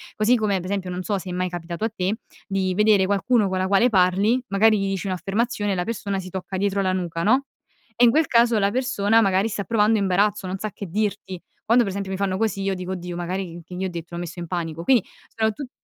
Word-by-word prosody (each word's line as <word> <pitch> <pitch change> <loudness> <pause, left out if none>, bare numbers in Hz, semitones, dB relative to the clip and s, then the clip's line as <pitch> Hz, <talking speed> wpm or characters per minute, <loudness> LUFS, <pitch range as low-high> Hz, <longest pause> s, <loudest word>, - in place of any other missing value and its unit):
Così 215 +4 +3
come 210 -4 +1
per 180 - -6
esempio 185 -1 -3
non 180 +1 -4
so 200 +2 -1
se 185 -1 -6
è - - -4
mai 180 0 -1
capitato 175 +2 -6
a - - 0
te 205 -1 -2 0.3
di 190 -2 -1
vedere 210 -2 +4
qualcuno 205 +2 +2
con 185 - -1
la 185 - 0
quale 200 +5 +4
parli 195 +4 +3
magari 215 +2 +4
gli 195 -1 -1
dici 195 0 -3
un'affermazione, 205 +3 -1
la 180 -1 -1
persona 200 -3 -3
si 185 -1 -7
tocca 190 +1 -6
dietro 200 0 0
la 185 -1 +1
nuca 170 -2 -3
no. 255 +7 +3 0.5
E 240 - +2
in 240 - +7
quel 310 +3 +2
caso 235 -1 +4
la 200 0 +2
persona 230 -3 +2
magari 195 0 +2
sta 205 -2 -3
provando 220 +1 +2
imbarazzo, 200 +1 +1
non 185 +1 -3
sa 215 - -3
che 200 - -7
dirti. 190 -1 -3 0.3
Quando 240 +2 +6
per 195 - -3
esempio 200 -1 -4
mi - - -3
fanno 190 -1 -1
così 215 -3 0
io 195 0 0
dico:" 185 0 -4
Oddio 180 -1 -6
magari 175 0 -4
c 165 - -25
che 180 - -8
gli 185 - -3
ho - - -2
detto, 170 -1 -7
l'ho 170 - -4
messo 175 0 -7
in 170 - -5
panico." 165 -2 -4
Quindi 240 +1 +4 0.2
sono 220 -1 0
tut 255 +5 -8
195 Hz, 255 wpm, -23 LUFS, 185-215 Hz, 0.5 s, in